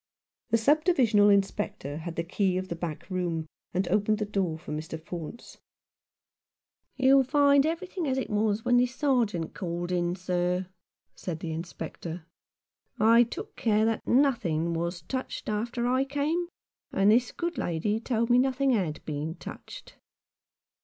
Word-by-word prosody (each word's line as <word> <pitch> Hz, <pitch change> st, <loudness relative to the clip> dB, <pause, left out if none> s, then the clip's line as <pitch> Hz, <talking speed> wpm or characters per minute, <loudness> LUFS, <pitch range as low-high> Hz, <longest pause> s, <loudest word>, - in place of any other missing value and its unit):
The 230 Hz, -, +4 dB
sub 295 Hz, +7 st, +3 dB
divisional 230 Hz, -, +4 dB
Inspector 200 Hz, -6 st, 0 dB
had 165 Hz, +1 st, -6 dB
the 170 Hz, -, -1 dB
key 185 Hz, +2 st, 0 dB
of 185 Hz, 0 st, -4 dB
the 170 Hz, -, -3 dB
back 165 Hz, -2 st, -5 dB
room, 175 Hz, -3 st, -1 dB, 0.3 s
and 185 Hz, +1 st, 0 dB
opened 210 Hz, +2 st, +2 dB
the 210 Hz, -, -1 dB
door 190 Hz, -6 st, -1 dB
for 160 Hz, -, -9 dB
Mr. 155 Hz, +1 st, -5 dB
Faunce. 170 Hz, +7 st, -8 dB, 1.4 s
"You'll 270 Hz, 0 st, +5 dB
find 280 Hz, +1 st, +4 dB
everything 345 Hz, 0 st, -3 dB
as 265 Hz, -1 st, 0 dB
it 265 Hz, -, -1 dB
was 210 Hz, +1 st, +1 dB
when 245 Hz, 0 st, +4 dB
the 250 Hz, +1 st, +4 dB
Sergeant 245 Hz, -, 0 dB
was -, -, -30 dB
called 175 Hz, -1 st, -4 dB
in, 175 Hz, 0 st, 0 dB
sir," 180 Hz, 0 st, -1 dB, 0.5 s
said 170 Hz, -3 st, -5 dB
the 165 Hz, -, -4 dB
Inspector. 170 Hz, 0 st, -6 dB, 0.7 s
"I 230 Hz, +3 st, +6 dB
took 240 Hz, -, -3 dB
care 215 Hz, -1 st, +2 dB
that 225 Hz, -1 st, -1 dB
nothing 175 Hz, -, +2 dB
was 170 Hz, 0 st, -3 dB
touched 260 Hz, +8 st, -5 dB
after 235 Hz, +3 st, -2 dB
I 255 Hz, +2 st, +2 dB
came; 295 Hz, +5 st, -1 dB, 0.4 s
and 195 Hz, +2 st, +4 dB
this 245 Hz, +3 st, +3 dB
good 345 Hz, 0 st, -3 dB
lady 175 Hz, +6 st, -1 dB
told 230 Hz, 0 st, 0 dB
me 245 Hz, -, +6 dB
nothing 270 Hz, +1 st, +2 dB
had 180 Hz, -, -1 dB
been 155 Hz, +2 st, -3 dB
touched." -, -, -10 dB
210 Hz, 155 wpm, -28 LUFS, 175-250 Hz, 1.4 s, I